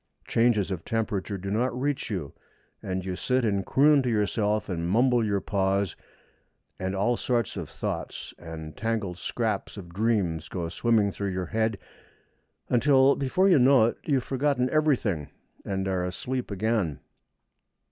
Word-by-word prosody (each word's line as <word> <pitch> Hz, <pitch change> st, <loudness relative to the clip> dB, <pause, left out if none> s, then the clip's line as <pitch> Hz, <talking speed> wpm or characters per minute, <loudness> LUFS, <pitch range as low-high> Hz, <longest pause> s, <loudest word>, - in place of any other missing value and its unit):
Changes 115 Hz, -4 st, +2 dB
of 85 Hz, -4 st, -4 dB
temperature 105 Hz, -3 st, -2 dB
do 95 Hz, +1 st, -5 dB
not 125 Hz, +3 st, 0 dB
reach 145 Hz, +1 st, -1 dB
you, 90 Hz, -10 st, -4 dB, 0.5 s
and 95 Hz, -1 st, -3 dB
you 95 Hz, -1 st, -3 dB
sit 125 Hz, +5 st, 0 dB
and 100 Hz, -3 st, +1 dB
croon 145 Hz, +1 st, +5 dB
to 125 Hz, -, -1 dB
yourself 105 Hz, 0 st, 0 dB
and 85 Hz, -2 st, -2 dB
mumble 120 Hz, +3 st, +3 dB
your 100 Hz, -2 st, +1 dB
paws, 95 Hz, -1 st, 0 dB, 0.8 s
and 95 Hz, +1 st, -2 dB
all 105 Hz, +5 st, +2 dB
sorts 120 Hz, -1 st, -1 dB
of -, -, -5 dB
thoughts -, -, -5 dB
and 80 Hz, -2 st, -8 dB
tangled 110 Hz, -6 st, -2 dB
scraps 110 Hz, -2 st, -2 dB
of 90 Hz, -4 st, -8 dB
dreams 95 Hz, -6 st, 0 dB
go 85 Hz, -3 st, -3 dB
swimming 105 Hz, +3 st, +2 dB
through 100 Hz, +1 st, -3 dB
your 95 Hz, -1 st, -2 dB
head 110 Hz, +2 st, 0 dB, 0.9 s
until, 135 Hz, +2 st, +4 dB
before 145 Hz, +8 st, +2 dB
you 175 Hz, -7 st, +6 dB
know 130 Hz, -2 st, +6 dB
it, 115 Hz, -, -1 dB
you 145 Hz, -, +1 dB
have 130 Hz, -, +1 dB
forgotten 135 Hz, -2 st, 0 dB
everything 125 Hz, -, +1 dB, 0.4 s
and 95 Hz, -1 st, -2 dB
are 95 Hz, -2 st, 0 dB
asleep 125 Hz, +8 st, -3 dB
again. 100 Hz, -, -1 dB
105 Hz, 155 wpm, -27 LUFS, 95-125 Hz, 0.9 s, you